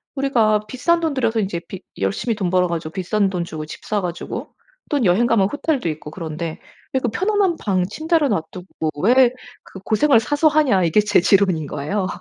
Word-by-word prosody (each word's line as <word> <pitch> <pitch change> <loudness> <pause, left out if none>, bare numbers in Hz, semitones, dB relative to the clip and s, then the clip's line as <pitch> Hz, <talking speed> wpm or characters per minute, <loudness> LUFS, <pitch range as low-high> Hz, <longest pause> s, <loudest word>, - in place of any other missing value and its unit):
우리가 225 -6 +2
비싼 335 +7 +1
돈 320 -3 0
들여서 230 -4 0
인제 190 -3 -2
비 190 -1 -8 0.2
열심히 100 - -1
돈 190 -4 -2
벌어 180 0 +2
가지고 165 -2 -4
비싼 195 +1 0
돈 180 -2 -2
주고 155 -2 -6
집 - - -10
사 210 -1 0
가지고 175 -1 -5 0.4
또 285 -6 +1
여행 200 +7 +3
가면 200 -5 +3
호텔도 290 - -1
있고 150 0 -6
그런데 165 -1 -5 0.3
왜 265 - +2
그 245 - 0
편안한 385 - +1
방 185 -3 +1
침대를 315 - 0
놔두고 160 -1 -3
"왜 250 +2 +5 0.3
그 190 - -12
고생을 260 +3 +4
사서 290 +5 +2
하냐?" 280 -12 +3
이게 165 +6 +3
제 210 0 +3
지론인 185 -6 +2
거예요. 185 +8 -2
205 Hz, 365 characters per minute, -20 LUFS, 175-265 Hz, 0.4 s, 왜